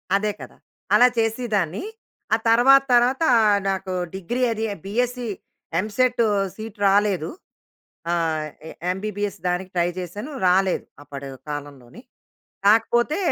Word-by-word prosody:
అదే 210 +1 +1
కదా. - - -11 0.4
అలా 250 - +7
చేసిదాన్ని, 220 - -1 0.5
ఆ - - 0
తర్వాత 270 +4 +6
తర్వాత 250 +6 +3 0.5
నాకు 190 -1 -2 0.2
డిగ్రీ 215 +7 -3
అది 220 0 -3 0.2
బీఎస్సీ, 245 +3 -1 0.5
ఎంసెట్ 235 +4 +1 0.3
సీట్ 220 0 -8
రాలేదు. 195 -4 +2 0.8
ఆహ్, 160 -2 0 0.5
ఎంబీబీఎస్ 205 0 -4
దానికి 180 +1 -2
ట్రై 175 0 +2
చేశాను, 205 - -6 0.2
రాలేదు 185 +1 +2 0.2
అప్పటి 140 -1 -8 0.2
కాలంలోనే. 140 - -8 0.7
కాకపోతే, 240 - +3
205 Hz, 105 wpm, -23 LUFS, 180-240 Hz, 0.8 s, అలా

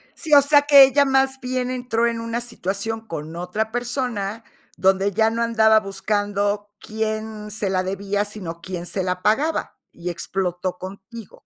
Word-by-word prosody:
Sí, 315 -2 -2
o 285 - +9
sea, 285 +1 +5
que 285 -1 +9
ella 275 +2 +4
más 265 0 +2
bien 255 -1 -2
entró 245 -2 0
en 230 -1 -2
una 230 +1 -3
situación 225 -1 -4
con 160 -2 -6
otra 180 +6 -3
persona, 235 -3 -3 0.3
donde 195 +1 +2
ya 220 +3 +3
no 230 +1 -2
andaba 220 -1 +4
buscando 205 0 -2
quién 215 -1 -4
se 210 -2 -2
la 185 -1 0
debía, 200 +2 -2
sino 185 -5 -7
quién 175 -1 -6
se 190 +2 -2
la 180 0 -2
pagaba, 290 - 0 0.2
y 175 +1 -6
explotó 180 +1 -3
contigo, 195 +4 -11
215 Hz, 160 wpm, -22 LUFS, 195-235 Hz, 0.3 s, o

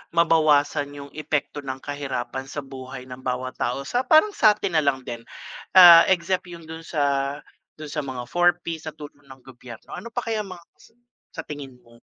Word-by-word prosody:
mabawasan 150 -3 +3
yung 140 0 -10
epekto 150 -1 -3
ng 135 -2 -5
kahirapan 135 -2 -4
sa 145 - -5
buhay 130 -1 -9
ng 125 0 -9
bawat 130 0 -4
tao 125 +3 -1
sa 245 - -1
parang 315 +9 +5
sa'tin 210 - +3
nalang 140 -3 +1
din, 115 -1 -7 0.5
ah, 175 -2 +11
except 180 0 0
yung 170 -1 -10
dun 160 0 -8
sa 140 -3 -1 0.4
dun 155 - -7
sa 150 - -2
mga 130 -2 -6
4P's 175 -1 0
na 155 - -9
tulong 145 -1 -12
ng 135 -1 -15
gobyerno. 125 -3 -12
Ano 235 - -7
pa 240 +1 -4
kaya 225 -1 -1
mga 185 -4 -11 0.7
sa 165 - -7
tingin 140 -4 -8
mo? 115 0 -20
145 Hz, 175 wpm, -24 LUFS, 130-170 Hz, 0.7 s, ah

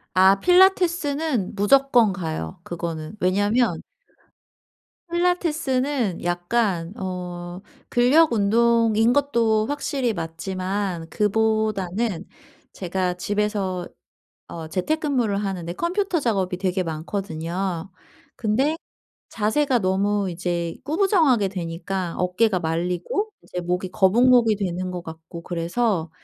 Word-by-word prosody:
아 190 +1 +6
필라테스는 325 - +2
무조건 240 0 +4
가요, 160 - -5
그거는. 170 0 -5
왜냐면 205 +6 +1 1.3
필라테스는 295 - 0
약간 175 0 0
어 180 -2 -6 0.3
근력 265 +5 +4
운동인 230 +1 +3
것도 230 -6 +2
확실히 275 -4 -1
맞지만 185 +1 -3
그보다는 215 -2 0 0.5
제가 180 0 -2
집에서 200 -2 -2 0.6
어 160 -1 -8
재택근무를 250 - 0
하는데 190 -4 -3
컴퓨터 360 - -1
작업이 195 -8 0
되게 185 0 -1
많거든요. 170 +1 -4 0.5
근데 260 +8 +1 0.5
자세가 250 +5 +1
너무 200 0 0
이제 170 -1 -2
구부정하게 310 - +3
되니까 175 0 -4
어깨가 185 +3 +1
말리고 175 - -2
이제 180 - -5
목이 180 +1 -2
거북목이 230 +3 +4
되는 185 -2 -3
것 180 -1 -5
같고 160 +1 -10
그래서 175 +1 -1
200 Hz, 245 characters per minute, -23 LUFS, 180-240 Hz, 1.3 s, 아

